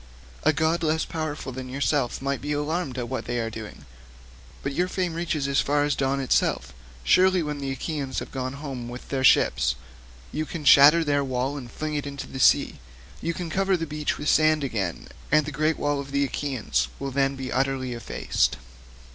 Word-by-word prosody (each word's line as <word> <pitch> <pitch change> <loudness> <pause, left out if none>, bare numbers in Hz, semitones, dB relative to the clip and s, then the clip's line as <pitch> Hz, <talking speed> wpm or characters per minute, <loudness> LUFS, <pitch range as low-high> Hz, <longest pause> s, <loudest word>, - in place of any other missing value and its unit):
A 155 - +4
god 160 +2 +1
less 160 0 +1
powerful 155 -4 -4
than 130 0 -7
yourself 135 -1 0
might 140 -1 -1
be 150 +1 -2
alarmed 150 -2 -2
at 120 -2 -3
what 130 +2 -4
they 120 - -2
are 115 -1 -2
doing, 110 -9 -9 0.8
but 140 - -2
your 180 +5 +1
fame 185 -2 -2
reaches 160 -4 -1
as 140 0 +2
far 145 +1 +1
as 145 0 +1
dawn 135 0 0
itself. 65 - +1 0.3
Surely 185 - +4
when 150 -1 -4
the 140 -1 -3
Achaeans 135 -1 -3
have - - -4
gone 130 0 -3
home 135 -4 -6
with 125 +1 -9
their 135 -1 -1
ships, 65 - +4 0.6
you 155 - -2
can 155 -1 -6
shatter 145 +4 +8
their 145 -2 +1
wall 130 +1 -1
and 130 -4 -7
fling 155 0 -4
it 145 -1 -2
into 140 0 -6
the 130 - -8
sea; - - +4 0.4
you 170 0 -2
can 175 -3 -5
cover 195 +1 +2
the 165 - -3
beach 150 -1 -2
with 150 - -5
sand 155 -1 +4
again, 100 -10 -3 0.2
and 150 0 +4
the 150 - -4
great 155 +2 +1
wall 145 -1 0
of 140 0 -6
the 140 0 +1
Achaeans 120 - -1
will 135 - -4
then 135 +1 +1
be 130 -1 -5
utterly 130 -1 0
effaced." 120 - -1
140 Hz, 200 wpm, -25 LUFS, 130-155 Hz, 0.8 s, shatter